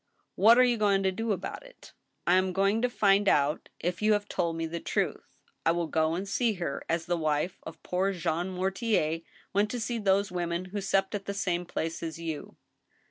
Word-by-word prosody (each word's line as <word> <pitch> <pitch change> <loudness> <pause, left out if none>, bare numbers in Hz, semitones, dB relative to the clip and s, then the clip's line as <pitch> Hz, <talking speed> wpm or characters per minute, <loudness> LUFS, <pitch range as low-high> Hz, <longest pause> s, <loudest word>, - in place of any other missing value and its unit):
" - - -47
What 225 +4 +7
are 255 - +7
you 245 -2 +3
going 200 -2 +2
to 190 - +2
do 225 +4 -2
about 195 -2 -3
it? - - -16
" - - -49
" - - -48
I 175 - +4
am 185 0 +3
going 195 +4 +2
to 250 - +2
find 200 -3 +3
out 145 +2 +1
if 175 +2 -2
you 215 0 +4
have 205 0 0
told 170 -4 -1
me 165 - -1
the 165 +1 -4
truth. - - -3 0.2
I 165 - +4
will 170 0 0
go 160 +1 +1
and 190 +3 -4
see 230 +2 +1
her, 175 -7 -4
as 165 0 0
the 175 0 0
wife 155 +2 -1
of 160 - -10
poor 185 +2 0
Jean 175 -1 -1
Mortier 190 -3 0 0.3
went 205 +2 +2
to 245 - -3
see 235 0 -2
those 200 -1 +2
women 175 0 -2
who 205 - -2
supped 195 +1 +1
at 200 -1 -3
the 200 - -4
same 180 -3 -1
place 165 -1 -3
as 165 0 -4
you." 165 -3 -6
185 Hz, 230 wpm, -29 LUFS, 170-205 Hz, 0.3 s, What